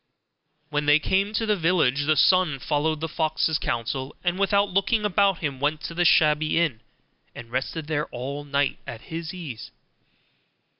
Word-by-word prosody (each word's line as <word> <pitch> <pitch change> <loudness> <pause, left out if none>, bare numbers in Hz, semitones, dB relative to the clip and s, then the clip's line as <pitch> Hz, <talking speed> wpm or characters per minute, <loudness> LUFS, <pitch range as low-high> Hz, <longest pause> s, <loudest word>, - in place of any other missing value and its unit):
When 150 0 -1
they 145 0 +6
came 195 +6 0
to 225 +1 0
the 210 -1 +2
village, 155 -6 +1
the 155 - +4
son 180 -1 +3
followed 150 +3 -1
the 165 - -1
fox's 160 0 0
counsel, 125 +3 -3
and 175 +1 -1
without 200 0 +2
looking 210 +3 +1
about 200 -2 +2
him 140 -4 -3
went 150 +2 -1
to - - -6
the 175 +1 0
shabby 155 0 +3
inn 145 -10 0 0.5
and 115 -1 -10
rested 135 +5 -3
there 150 -1 -2
all 135 +4 -6
night 140 -1 -1
at 115 - -7
his 165 +3 -6
ease. 135 - -8
155 Hz, 165 wpm, -24 LUFS, 140-180 Hz, 0.5 s, they